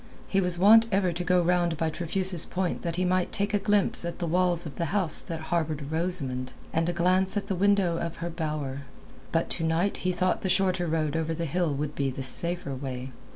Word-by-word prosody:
He 195 Hz, -, +1 dB
was 180 Hz, -1 st, -1 dB
wont 220 Hz, +5 st, +7 dB
ever 190 Hz, -3 st, +1 dB
to 175 Hz, +2 st, -3 dB
go 180 Hz, 0 st, +3 dB
round 175 Hz, -1 st, +1 dB
by 160 Hz, 0 st, 0 dB
Trefusis 175 Hz, +1 st, 0 dB
Point 185 Hz, -1 st, -2 dB
that 170 Hz, -1 st, -3 dB
he 185 Hz, +1 st, 0 dB
might 180 Hz, 0 st, +1 dB
take 200 Hz, +1 st, -1 dB
a 205 Hz, -, +3 dB
glimpse 205 Hz, -2 st, +2 dB
at 170 Hz, 0 st, -4 dB
the 175 Hz, -, -3 dB
walls 175 Hz, 0 st, +1 dB
of 150 Hz, -, -8 dB
the 170 Hz, -, -1 dB
house 180 Hz, -2 st, +2 dB
that 165 Hz, -1 st, -5 dB
harboured 155 Hz, -3 st, -1 dB
Rosamund 155 Hz, -7 st, 0 dB, 0.2 s
and 165 Hz, +1 st, +1 dB
a -, -, +2 dB
glance 185 Hz, +3 st, +2 dB
at 200 Hz, -, -2 dB
the 200 Hz, -, -2 dB
window 195 Hz, -2 st, +2 dB
of 170 Hz, -1 st, -4 dB
her 170 Hz, 0 st, -5 dB
bower. 150 Hz, -4 st, -4 dB, 0.5 s
But 165 Hz, 0 st, 0 dB
to 165 Hz, -, -1 dB
night 165 Hz, +5 st, 0 dB
he 185 Hz, -, -1 dB
thought 185 Hz, +1 st, 0 dB
the 190 Hz, -, -2 dB
shorter 185 Hz, -1 st, +2 dB
road 155 Hz, -1 st, -1 dB
over 160 Hz, 0 st, -1 dB
the 170 Hz, +1 st, -3 dB
hill 170 Hz, +1 st, 0 dB
would 145 Hz, +1 st, -3 dB
be 140 Hz, -2 st, -1 dB
the 135 Hz, +1 st, -5 dB
safer 170 Hz, +2 st, -2 dB
way. 130 Hz, -1 st, -6 dB
170 Hz, 225 wpm, -27 LUFS, 160-185 Hz, 0.5 s, wont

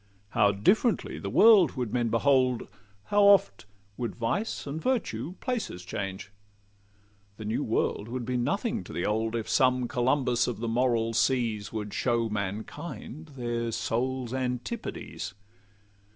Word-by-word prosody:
How 100 Hz, -1 st, +3 dB
differently 200 Hz, -, +1 dB
the -, -, -4 dB
world 210 Hz, -7 st, +6 dB
would 125 Hz, -5 st, -3 dB
men 120 Hz, -2 st, +1 dB
behold! 130 Hz, +1 st, +2 dB, 0.4 s
How 205 Hz, -, +2 dB
oft 195 Hz, -, +4 dB, 0.3 s
would 120 Hz, -4 st, -3 dB
vice 120 Hz, -, -2 dB
and 145 Hz, +3 st, -4 dB
virtue 180 Hz, -, -1 dB
places 225 Hz, -, -3 dB
change! 95 Hz, 0 st, -5 dB, 1.1 s
The 110 Hz, -, -7 dB
new 110 Hz, -, -1 dB
world 105 Hz, -, -1 dB
would 120 Hz, 0 st, -4 dB
be 125 Hz, -, -2 dB
nothing 195 Hz, -, -1 dB
to -, -, -9 dB
the 85 Hz, -, -2 dB
old, 110 Hz, +2 st, 0 dB
If 115 Hz, -2 st, -3 dB
some 125 Hz, +2 st, +3 dB
Columbus 125 Hz, 0 st, +1 dB
of 125 Hz, -, -2 dB
the 115 Hz, -, -3 dB
moral 115 Hz, -1 st, +1 dB
seas 115 Hz, -4 st, +1 dB
Would 105 Hz, -2 st, -5 dB
show 120 Hz, -2 st, +1 dB
mankind 115 Hz, -, -5 dB
their 120 Hz, -1 st, -2 dB
souls' 120 Hz, +3 st, -2 dB
antipodes. 125 Hz, -, -4 dB
120 Hz, 135 wpm, -28 LUFS, 110-140 Hz, 1.1 s, world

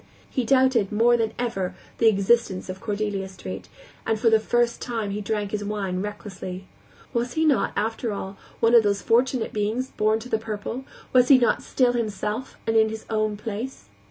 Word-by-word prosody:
He 255 Hz, -, -2 dB
doubted, 260 Hz, -5 st, +3 dB
more 230 Hz, +3 st, +4 dB
than 225 Hz, -2 st, 0 dB
ever, 210 Hz, -7 st, -2 dB, 0.2 s
the 230 Hz, -, +5 dB
existence 200 Hz, -2 st, +2 dB
of 185 Hz, +1 st, -6 dB
Cordelia 205 Hz, -3 st, -2 dB
Street, 190 Hz, -, -8 dB, 0.3 s
and 220 Hz, -, 0 dB
for 225 Hz, 0 st, +3 dB
the 220 Hz, -, +6 dB
first 240 Hz, +1 st, +1 dB
time 225 Hz, -4 st, -3 dB
he 205 Hz, +1 st, -3 dB
drank 205 Hz, -1 st, -2 dB
his 210 Hz, -1 st, -2 dB
wine 200 Hz, -3 st, -2 dB
recklessly. 195 Hz, -2 st, -6 dB, 0.5 s
Was 240 Hz, +1 st, -1 dB
he 320 Hz, 0 st, +1 dB
not, 290 Hz, -5 st, +3 dB
after 225 Hz, +2 st, -1 dB
all, 200 Hz, -1 st, -5 dB, 0.3 s
one 230 Hz, +1 st, +4 dB
of 235 Hz, -, +9 dB
those 200 Hz, -2 st, 0 dB
fortunate 245 Hz, +1 st, +2 dB
beings 215 Hz, +5 st, -1 dB
born 215 Hz, +1 st, +2 dB
to 225 Hz, +2 st, -8 dB
the 220 Hz, -3 st, 0 dB
purple, 225 Hz, +4 st, -5 dB, 0.3 s
was 250 Hz, -1 st, +6 dB
he 275 Hz, -, +8 dB
not 240 Hz, -2 st, +2 dB
still 250 Hz, -2 st, +2 dB
himself 215 Hz, +1 st, -3 dB
and 225 Hz, -, 0 dB
in 220 Hz, 0 st, +5 dB
his 220 Hz, 0 st, -7 dB
own 215 Hz, -1 st, 0 dB
place? 220 Hz, -, -6 dB
220 Hz, 185 wpm, -25 LUFS, 205-240 Hz, 0.5 s, of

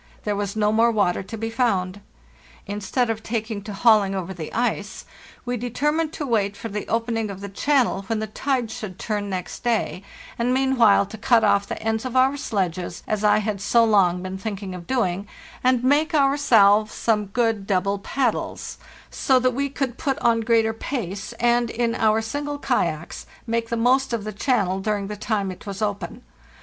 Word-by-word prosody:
There 210 Hz, -1 st, -1 dB
was 200 Hz, 0 st, -3 dB
no 210 Hz, -1 st, +2 dB
more 225 Hz, +2 st, +4 dB
water 200 Hz, -6 st, +1 dB
to 210 Hz, +4 st, -8 dB
be 225 Hz, +1 st, -3 dB
found. 205 Hz, -5 st, 0 dB, 0.6 s
Instead 210 Hz, +4 st, -1 dB
of 220 Hz, -1 st, -4 dB
taking 220 Hz, -2 st, -3 dB
to 210 Hz, +1 st, -8 dB
hauling 200 Hz, -2 st, +4 dB
over 190 Hz, 0 st, -4 dB
the 165 Hz, -4 st, -7 dB
ice, 220 Hz, -3 st, -2 dB, 0.4 s
we 245 Hz, 0 st, -2 dB
determined 295 Hz, +7 st, -1 dB
to 295 Hz, -, -4 dB
wait 210 Hz, -5 st, 0 dB
for 225 Hz, -, -6 dB
the 210 Hz, 0 st, -5 dB
opening 225 Hz, -1 st, -1 dB
of 195 Hz, -1 st, -7 dB
the 200 Hz, -, -6 dB
channel 250 Hz, -1 st, +1 dB
when 225 Hz, -1 st, -1 dB
the 215 Hz, -, -2 dB
tide 245 Hz, +1 st, -2 dB
should 215 Hz, -7 st, -7 dB
turn 205 Hz, -1 st, -3 dB
next 185 Hz, -2 st, -5 dB
day, 230 Hz, -5 st, 0 dB, 0.4 s
and 245 Hz, +2 st, +1 dB
meanwhile 260 Hz, -7 st, +4 dB
to 215 Hz, +2 st, -10 dB
cut 230 Hz, 0 st, +4 dB
off 200 Hz, 0 st, +3 dB
the -, -, -5 dB
ends 220 Hz, 0 st, 0 dB
of 255 Hz, -1 st, -5 dB
our 260 Hz, +2 st, +4 dB
sledges, 185 Hz, -, -3 dB
as 215 Hz, -1 st, -1 dB
I 210 Hz, 0 st, +5 dB
had 205 Hz, -3 st, -2 dB
so 235 Hz, +3 st, +4 dB
long 185 Hz, -5 st, +3 dB
been 185 Hz, 0 st, -5 dB
thinking 200 Hz, -2 st, -5 dB
of 175 Hz, -1 st, -9 dB
doing, 200 Hz, -6 st, 0 dB, 0.4 s
and 250 Hz, -1 st, +3 dB
make 295 Hz, +4 st, +2 dB
ourselves 230 Hz, -8 st, +4 dB
some 210 Hz, -3 st, +1 dB
good 225 Hz, -1 st, 0 dB
double 195 Hz, +1 st, +1 dB
paddles, 250 Hz, +3 st, -2 dB, 0.3 s
so 265 Hz, -, +2 dB
that 255 Hz, 0 st, +2 dB
we 280 Hz, +3 st, -1 dB
could 265 Hz, -3 st, -3 dB
put 270 Hz, -2 st, 0 dB
on 235 Hz, -1 st, +2 dB
greater 225 Hz, -1 st, +2 dB
pace, 210 Hz, -5 st, -4 dB
and, 240 Hz, 0 st, +2 dB
in 235 Hz, 0 st, 0 dB
our 220 Hz, 0 st, +2 dB
single 290 Hz, +5 st, -3 dB
kayaks, 170 Hz, -, -2 dB, 0.2 s
make 230 Hz, -1 st, -1 dB
the 235 Hz, -, -1 dB
most 250 Hz, +2 st, +2 dB
of 225 Hz, -3 st, -1 dB
the 215 Hz, 0 st, -5 dB
channel 195 Hz, -5 st, 0 dB
during 205 Hz, 0 st, -1 dB
the 210 Hz, -, -4 dB
time 205 Hz, -2 st, -1 dB
it 185 Hz, -, -12 dB
was 195 Hz, -1 st, -5 dB
open. 205 Hz, -5 st, -3 dB
220 Hz, 190 wpm, -23 LUFS, 200-245 Hz, 0.6 s, I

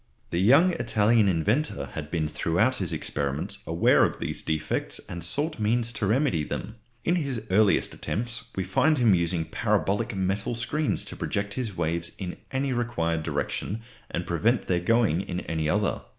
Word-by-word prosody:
The 85 Hz, -, 0 dB
young 140 Hz, -, +6 dB
Italian 110 Hz, -4 st, +3 dB
inventor 95 Hz, -, 0 dB
had 75 Hz, -1 st, -5 dB
been 80 Hz, -2 st, 0 dB
throughout 85 Hz, +11 st, +1 dB
his 95 Hz, -4 st, -2 dB
experiments 70 Hz, -1 st, -2 dB
aware 85 Hz, +1 st, +4 dB
of -, -, +1 dB
these -, -, -3 dB
defects 80 Hz, -1 st, -1 dB
and 85 Hz, -1 st, -6 dB
sought 145 Hz, -, 0 dB
means 115 Hz, +2 st, +1 dB
to 105 Hz, -4 st, -2 dB
remedy 110 Hz, -, +2 dB
them. 110 Hz, +8 st, -5 dB, 0.3 s
In 175 Hz, +2 st, +2 dB
his 135 Hz, -9 st, -2 dB
earliest 105 Hz, +1 st, +3 dB
attempts 115 Hz, +1 st, -3 dB
we 95 Hz, -, -1 dB
find 150 Hz, -, +2 dB
him 120 Hz, -5 st, +5 dB
using 85 Hz, -1 st, +1 dB
parabolic 100 Hz, +7 st, 0 dB
metal 95 Hz, +4 st, -1 dB
screens 145 Hz, +6 st, -1 dB
to -, -, -7 dB
project 100 Hz, 0 st, -2 dB
his 115 Hz, -7 st, -4 dB
waves 85 Hz, 0 st, -1 dB
in 90 Hz, -2 st, -5 dB
any 135 Hz, 0 st, -1 dB
required 85 Hz, -10 st, -1 dB
direction 105 Hz, +6 st, -3 dB, 0.3 s
and 85 Hz, -, -3 dB
prevent 105 Hz, +7 st, +1 dB
their 90 Hz, -1 st, +1 dB
going 100 Hz, -2 st, +2 dB
in 90 Hz, -2 st, -4 dB
any 80 Hz, -2 st, -2 dB
other. 105 Hz, +4 st, +1 dB
100 Hz, 165 wpm, -26 LUFS, 85-120 Hz, 0.3 s, young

